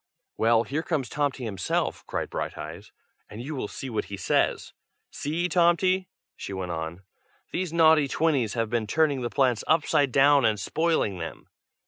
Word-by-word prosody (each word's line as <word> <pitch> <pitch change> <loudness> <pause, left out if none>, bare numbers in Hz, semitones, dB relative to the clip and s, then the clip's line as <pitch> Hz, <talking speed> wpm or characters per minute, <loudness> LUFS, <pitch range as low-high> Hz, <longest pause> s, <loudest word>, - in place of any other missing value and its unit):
"Well, 115 0 +3
here 145 +6 -2
comes 155 -6 -2
Tomty 145 -3 -1
himself!" 100 -5 -2
cried - - -3
Brighteyes, - - -6 0.4
"and 105 - -9
you 135 +6 -5
will 130 -7 -3
see 135 - -7
what 115 -4 -2
he 100 - -7
says. 95 - 0 0.4
See, 165 +5 -2
Tomty!" 185 +2 +2 0.3
she 100 - -7
went 95 -2 -4
on. 80 +2 -5 0.5
"These 180 -2 -2
naughty 160 -3 +5
twinnies 135 -8 +1
have 115 -2 -1
been 115 -3 0
turning 150 0 +2
the 120 - -2
plants 130 -5 +1
upside 145 -3 +2
down, 140 +2 +5
and 110 -2 +2
spoiling 160 - 0
them!" 85 - -7
135 Hz, 160 wpm, -26 LUFS, 110-160 Hz, 0.5 s, naughty